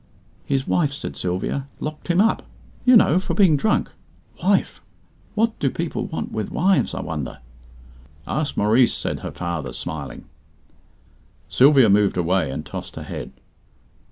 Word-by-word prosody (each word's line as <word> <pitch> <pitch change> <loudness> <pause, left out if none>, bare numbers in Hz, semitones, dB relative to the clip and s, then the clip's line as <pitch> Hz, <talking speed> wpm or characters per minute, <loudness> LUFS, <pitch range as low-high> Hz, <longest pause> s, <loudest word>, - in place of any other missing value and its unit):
"His 135 -1 0
wife," 150 -5 +2
said 145 - -6
Sylvia, 95 +10 -2
"locked 150 0 -6
him 175 0 +2
up, 225 +3 +3 0.4
you 250 -1 +8
know, 180 -4 +4
for 190 - -3
being 190 -7 +5
drunk. 210 +9 +1 0.5
Wife! - - +1 0.5
What 225 +1 +1
do 135 - +1
people 165 +5 -3
want 160 - -5
with 110 -2 -3
wives, 190 +3 +2
I - - -3
wonder?" 75 -5 -5 0.9
"Ask 155 -1 -2
Maurice," 115 +4 +4
said - - -3
her - - -5
father, 85 -3 -4
smiling. 75 -3 -6 1.2
Sylvia 135 -2 +6
moved 100 -1 +3
away, 90 -2 +1
and 65 - -5
tossed - - -7
her - - -6
head. - - -7
135 Hz, 145 wpm, -22 LUFS, -, 1.2 s, you